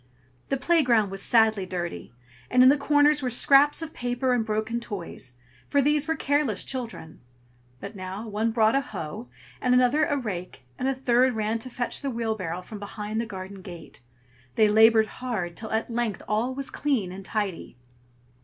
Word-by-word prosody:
The 275 - +1
playground 255 - +2
was 195 0 -4
sadly 220 -3 +3
dirty, 175 -6 -5 0.4
and 250 - +5
in 255 - +8
the 280 - +6
corners 290 +1 +3
were 255 - -1
scraps 280 +6 +4
of 320 0 -7
paper 245 +1 -1
and 240 -2 +1
broken 220 +2 -2
toys, 190 - -7 0.4
for 285 - +2
these 295 +2 +2
were 320 - +1
careless 285 -8 0
children. 235 -11 -6 0.6
But 200 +2 -8
now, 190 +3 -6
one 215 +2 -1
brought 220 0 +3
a 275 - +3
hoe, 210 - -7 0.3
and 250 0 +3
another 255 +5 +4
a 290 - 0
rake, 185 - -6
and 255 - -1
a 270 - +1
third 255 -1 +2
ran 220 +1 -1
to 255 - -8
fetch 245 -1 -3
the 280 - -2
wheelbarrow 220 -8 -3
from 210 +2 -9
behind 210 +2 -4
the 230 - -5
garden 190 -1 -8
gate. 175 -8 -11 0.5
They 215 - +5
labored 220 +1 +6 0.2
hard, 200 -9 -3
till 220 +3 -7
at 225 +2 -2
length 230 -5 -2
all 230 +5 0
was 275 0 -5
clean 255 -11 -1
and 195 +1 -8
tidy. 195 - -4
225 Hz, 180 wpm, -26 LUFS, 205-260 Hz, 0.6 s, in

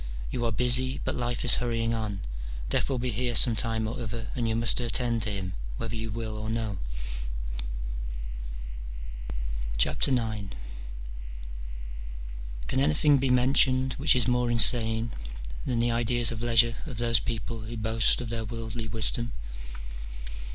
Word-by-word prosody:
you 120 - -2
are 115 - +1
busy, 125 +3 +5
but - - -1
life 120 0 -2
is 120 - +9
hurrying 115 -1 0
on: 105 -3 -3 0.5
death - - +1
will 135 - 0
be 125 0 -1
here 120 +2 -1
some 115 +1 +5
time 110 0 -1
or 115 +2 -4
other, 115 0 -4
and 115 -2 -1
you 110 - +1
must 115 +2 +2
attend 120 -1 0
to 110 - 0
him, 95 -2 -3 0.2
whether 115 0 -4
you 110 0 -3
will 110 0 -4
or 110 +1 -4
no. 110 -4 -2 3.0
IX. 70 +6 +1 2.6
Can - - 0
anything 145 0 +4
be 135 0 +1
mentioned 130 +1 +4
which 145 0 +5
is 125 -4 +4
more 125 -1 +2
insane 115 -1 +7 0.6
than 125 - +1
the 120 +1 +2
ideas 120 0 +2
of 115 -1 -4
leisure 115 -1 +4
of 125 -6 -6
those 115 -1 +4
people 115 0 -4
who 115 +2 -6
boast 110 +2 +2
of 120 - -4
their 115 0 -2
worldly 115 0 -5
wisdom 110 +3 0
115 Hz, 145 wpm, -28 LUFS, 110-125 Hz, 3.0 s, is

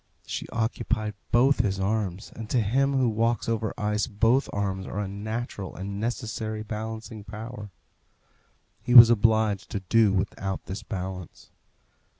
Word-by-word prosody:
She - - -5
occupied 110 -1 -1 0.2
both 130 +3 +4
his 100 -4 +1
arms, 100 -1 -2
and 110 -1 -7
to 125 - +2
him 135 +6 +1
who 130 -2 +3
walks 115 0 0
over 115 -2 -1
ice 105 +1 0
both 115 +4 +2
arms 95 -2 -2
are 100 - -4
a 105 - -2
natural 105 0 -5
and 100 +1 -5
necessary 110 -1 -3
balancing 110 0 -6
power. 105 0 -8 1.1
He 125 - 0
was 120 -1 +12
obliged 110 -3 +2
to 100 - -3
do 105 +2 +3
without 95 0 -2
this 95 +2 -5
balance. 95 -3 -7
110 Hz, 145 wpm, -26 LUFS, 100-115 Hz, 1.1 s, was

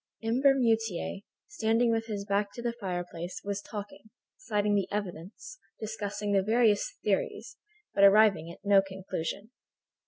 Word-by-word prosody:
M. 230 +3 0
Bermutier, 225 -9 +2 0.3
standing 230 - +1
with 225 0 -1
his 205 -2 -4
back 200 0 0
to 240 - -7
the 235 -1 -1
fireplace, 175 -4 -5
was 200 0 -3
talking, 205 0 -8 0.3
citing 210 -7 0
the 200 -2 0
evidence, 205 - -6 0.2
discussing 210 -1 -4
the 195 -1 +4
various 220 - +2
theories, - - -1 0.4
but 200 - +3
arriving 200 -4 +5
at 170 - -15
no 200 -1 +6
conclusion. 190 +2 -5
205 Hz, 135 wpm, -29 LUFS, 195-225 Hz, 0.4 s, no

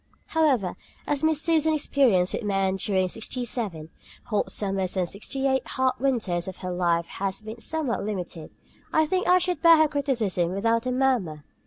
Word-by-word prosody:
However, 270 - +1 0.3
as 290 0 -1
Miss 315 -1 +2
Susan's 315 -2 +2
experience 205 -11 +3
with - - -2
men 195 -2 0
during 190 -1 +1
the - - -3
sixty 235 +4 -3
seven 195 -10 -3 0.3
hot 210 -4 -1
summers 195 -2 -1
and 180 -2 +1
sixty 265 +9 -4
eight 265 -1 +1
hard 260 -1 +1
winters 215 -10 0
of 190 - -6
her 180 - -2
life 170 -1 +1
has 195 +3 -4
been 220 +2 -8
somewhat 300 -1 -2
limited, 180 -6 -5 0.4
I 315 - +3
think 370 +4 -1
I 360 - +6
should 360 0 -1
bear 335 -1 +8
her 315 0 +5
criticism 230 - -1
without 230 +4 0
a - - 0
murmur. 245 - 0
225 Hz, 180 wpm, -25 LUFS, 190-280 Hz, 0.4 s, bear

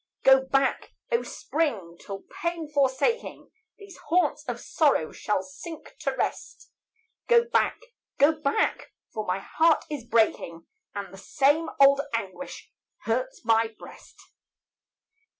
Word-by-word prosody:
Go 265 0 +7
back, 270 0 0 0.2
O 470 - +3
spring! 220 - -2
till 195 -1 -8 0.2
pain, 340 -2 -2
forsaking 285 - 0 0.3
These 400 -3 -13
haunts 315 -2 +2
of 245 -3 -4
sorrow, 280 - +1
shall 210 -3 -1
sink 310 - -10
to - - -1
rest. - - -4 0.6
Go 475 -1 +6
back! 470 - +1 0.4
go 285 +3 +6
back! 305 -3 -1 0.2
for 215 -1 -4
my 180 +1 +1
heart 320 +11 +2
is 290 -5 -4
breaking, 220 -8 0 0.3
And 200 -2 -6
the 195 - -11
same 290 +8 +2
old 275 0 +7
anguish 230 +5 -6 0.3
hurts - - -2
my 225 0 +2
breast. - - -14
275 Hz, 125 wpm, -26 LUFS, 220-320 Hz, 0.6 s, Go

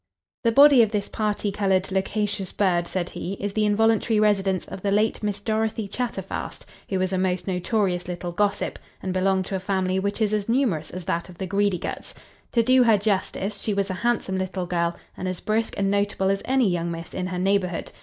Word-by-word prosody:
"The 230 - +3
body 280 +1 +8
of 220 - +4
this 205 -2 -2
party 210 -1 -1
coloured, 195 -2 +1
loquacious 195 0 -1
bird, 175 -4 +1
said 180 -1 -2
he, 185 - -5
is 200 0 -4
the 215 0 +2
involuntary 225 +1 +3
residence 195 -3 +2
of 190 - -8
the 200 - 0
late 210 +2 +1
Miss 205 -1 -2
Dorothy 220 0 -1
Chatterfast; 205 -3 -4 0.2
who 190 - 0
was 185 0 0
a 185 - +1
most 185 -1 0
notorious 185 -1 0
little 175 0 -4
gossip, 200 +3 -1 0.2
and 190 -1 -2
belonged 190 0 +1
to 195 - -4
a - - -1
family 190 0 0
which 200 +3 -2
is 215 -2 +1
as 210 0 -1
numerous 225 - +1
as 180 -1 -7
that 170 +2 -2
of 180 - -12
the 190 - -3
Greedyguts. 200 -1 -1 0.4
To 235 - +4
do 255 +2 +5
her 225 -3 +5
justice, 200 0 -1
she 210 - -1
was 200 -1 0
a 185 - -5
handsome 230 -5 0
little 185 -1 -3
girl, 170 -1 -1 0.2
and 185 - -4
as 185 -1 -3
brisk 220 +1 -1
and 195 0 +1
notable 200 -1 +1
as 195 - -1
any 260 -3 +3
young 170 -2 0
miss 165 0 -6
in 185 0 -2
her 185 -1 -4
neighbourhood. 185 -1 0
195 Hz, 210 wpm, -24 LUFS, 185-210 Hz, 0.4 s, body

